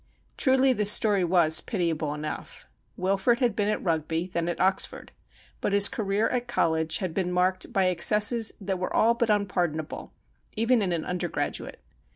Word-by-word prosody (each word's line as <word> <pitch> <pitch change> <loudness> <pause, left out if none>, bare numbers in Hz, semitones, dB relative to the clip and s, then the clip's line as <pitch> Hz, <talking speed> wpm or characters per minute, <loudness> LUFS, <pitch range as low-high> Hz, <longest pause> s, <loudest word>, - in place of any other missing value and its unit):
Truly 265 -1 +4
the 210 -3 -1
story 205 -1 +4
was 170 -3 +3
pitiable 165 -6 -2
enough. 150 0 -7 0.3
Wilfrid 195 +6 +1
had 245 -3 0
been 205 -1 0
at 215 - -2
Eugby, 165 0 -1
then 170 0 -2
at 170 - -4
Oxford, 190 +1 -1 0.5
but 200 - -1
his 200 0 +8
career 205 0 -1
at 245 -1 -2
college 160 -8 0
had 185 -5 -4
been 180 -1 -2
marked 185 +1 0
by 190 -1 +1
excesses 210 +5 +2
that 190 -2 -3
were 185 - -3
all 230 +2 +3
but 235 -1 -1
unpardonable, 180 -7 -2 0.5
even 230 +1 +2
in 190 -3 -1
an 165 -2 -2
undergraduate. 180 -1 -4
190 Hz, 165 wpm, -26 LUFS, 170-215 Hz, 0.5 s, his